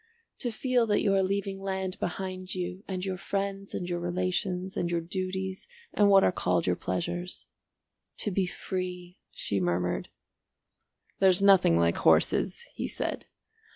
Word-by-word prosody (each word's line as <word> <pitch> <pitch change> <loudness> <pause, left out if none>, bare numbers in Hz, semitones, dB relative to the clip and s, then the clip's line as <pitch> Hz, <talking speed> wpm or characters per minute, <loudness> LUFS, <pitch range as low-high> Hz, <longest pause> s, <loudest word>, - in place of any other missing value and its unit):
"To 245 - -1
feel 245 +1 +1
that 205 -1 +2
you 200 - +3
are 195 - +4
leaving 195 0 -1
land 190 -1 -3
behind 185 +1 -4
you 180 +1 -4
and 185 -1 -3
your 190 -1 -2
friends 195 +1 -3
and 175 - -3
your 175 -1 -2
relations 185 +1 -1
and 175 - -1
your 170 -1 +1
duties 190 +2 -4 0.3
and 205 -1 +4
what 195 -1 +7
are - - +4
called 90 - 0
your 90 - +2
pleasures. 175 - -3 0.8
To 210 - 0
be 190 0 +1
free," 180 -1 -5
she 100 - -2
murmured. 90 0 -1 1.1
"There's 190 0 +5
nothing 195 - +6
like 85 0 +2
horses," - - +3
he - - -3
said. - - -3
185 Hz, 155 wpm, -29 LUFS, 175-195 Hz, 1.1 s, what